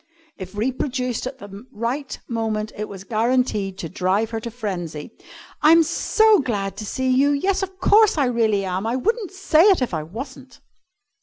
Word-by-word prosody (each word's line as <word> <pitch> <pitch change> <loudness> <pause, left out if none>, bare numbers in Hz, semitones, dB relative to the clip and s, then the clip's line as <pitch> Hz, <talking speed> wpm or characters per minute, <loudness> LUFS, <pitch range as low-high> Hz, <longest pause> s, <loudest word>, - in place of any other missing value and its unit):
If 185 0 -9
reproduced 250 +1 -2
at 260 0 -7
the 205 -2 -11
right 245 +6 -3
moment, 220 -2 -2
it 210 +1 -5
was 195 -1 -9
guaranteed 220 -3 0
to 170 - -5
drive 190 +6 0
her 225 - -2
to 235 - -6
frenzy, 180 -10 -5 0.5
"I'm 325 +2 +6
so 435 +6 +3
glad 205 -8 -2
to 215 - -6
see 260 +3 -1
you. 270 +3 +4
Yes, 375 +7 +1
of 380 -1 -5
course 420 0 +5
I 285 - +3
really 220 -5 +1
am! 185 +3 -2
I 235 - 0
wouldn't 425 - -1
say 375 -5 +2
it 395 -3 +5
if 255 -7 -2
I 160 - -1
wasn't!" 255 - -9
235 Hz, 175 wpm, -22 LUFS, 205-280 Hz, 0.5 s, I'm